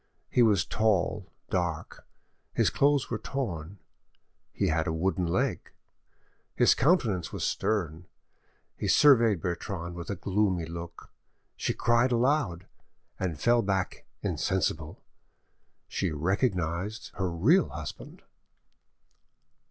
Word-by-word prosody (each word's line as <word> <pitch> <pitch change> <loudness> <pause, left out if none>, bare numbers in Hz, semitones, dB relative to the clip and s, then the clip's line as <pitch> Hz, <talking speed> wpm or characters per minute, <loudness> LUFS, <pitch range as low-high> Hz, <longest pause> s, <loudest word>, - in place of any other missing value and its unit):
He 125 - +3
was 105 -6 +4
tall, 105 -2 0 0.2
dark; 85 -4 -3 0.5
his - - +2
clothes 140 -3 +2
were 110 - -1
torn; 100 - -4 0.7
he - - 0
had 80 0 0
a - - +1
wooden 90 +2 0
leg; 85 - -1 0.9
his - - +5
countenance 115 - +1
was - - -4
stern. 90 -5 -1 0.7
He - - -4
surveyed 115 - +5
Bertrande 85 0 -4
with 85 0 -7
a 100 - -1
gloomy 95 -1 0
look: 85 +1 -9 0.4
she - - -2
cried 120 +2 +2
aloud, 120 - +1 0.5
and 85 -5 -2
fell 120 0 +3
back 95 -2 -2 0.2
insensible;... 85 -4 -2 0.8
she - - -1
recognised 90 - -1
her 95 -2 0
real 115 - +3
husband! 75 0 -8
95 Hz, 110 wpm, -28 LUFS, 85-115 Hz, 0.9 s, his